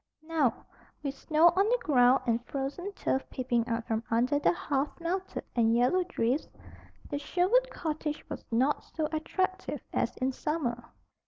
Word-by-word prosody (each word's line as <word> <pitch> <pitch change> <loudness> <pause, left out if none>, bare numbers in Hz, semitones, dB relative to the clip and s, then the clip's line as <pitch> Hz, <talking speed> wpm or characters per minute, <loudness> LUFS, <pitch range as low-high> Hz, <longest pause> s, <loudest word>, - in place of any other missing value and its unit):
Now, 315 -6 0 0.4
with 275 -2 -2
snow 315 +4 +4
on 390 +5 +2
the - - +4
ground 255 -2 +5
and 235 -1 +1
frozen 285 +8 -3
turf 265 - 0
peeping 240 -2 0
out 230 -1 -2
from 225 0 -1
under 250 +6 +2
the - - +4
half 290 -3 -2
melted 370 +3 -3
and 230 -1 +4
yellowed 345 +10 +3
drifts, 255 -2 0 0.6
the 285 - -1
Sherwood 380 +12 +2
cottage 310 -2 -4
was - - -6
not 260 +6 +2
so 315 -2 -3
attractive 375 +4 -2
as - - 0
in 260 +1 0
summer. 250 -4 -2
290 Hz, 155 wpm, -30 LUFS, 245-340 Hz, 0.6 s, ground